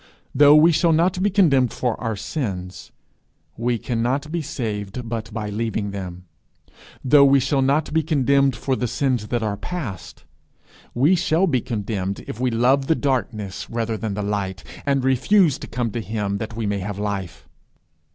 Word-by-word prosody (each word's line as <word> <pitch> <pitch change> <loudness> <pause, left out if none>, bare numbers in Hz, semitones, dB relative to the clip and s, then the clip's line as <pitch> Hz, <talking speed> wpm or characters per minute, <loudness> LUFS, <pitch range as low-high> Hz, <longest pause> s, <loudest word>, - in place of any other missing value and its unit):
Though 145 0 +7
we 160 +3 +6
shall 165 +1 +3
not 180 +3 +2
be 205 - +3
condemned 145 - +3
for 125 -3 -1
our 115 -2 -2
sins, 95 - -5 0.6
we 120 +1 0
cannot 125 +6 -2
be 170 0 -1
saved 115 -5 -4
but 110 -1 -4
by 105 -1 -4
leaving 110 -1 -2
them; 90 -2 -7 0.8
though 140 +2 +6
we 140 0 +5
shall 135 +1 +1
not 145 +3 +1
be 160 - +3
condemned 140 -3 +2
for 130 +3 -1
the 125 - -2
sins 125 -3 -1
that 120 +1 -1
are 105 -2 -2
past, 120 - -6 0.7
we 140 +9 +4
shall 175 0 +2
be 130 -9 +1
condemned 100 -4 -3
if 110 - -7
we 130 0 +1
love 130 +4 +2
the 160 - +3
darkness 120 -9 -2
rather 115 -1 -2
than 110 -2 -4
the 105 - -3
light, 100 -2 -3 0.2
and 140 -2 +2
refuse 145 - +3
to - - -8
come 120 -2 -2
to 115 - -3
him 105 -2 -3
that 110 +1 -6
we 115 -1 -3
may 100 -1 -1
have 100 +1 -5
life. 100 -4 -4
120 Hz, 175 wpm, -22 LUFS, 105-140 Hz, 0.8 s, Though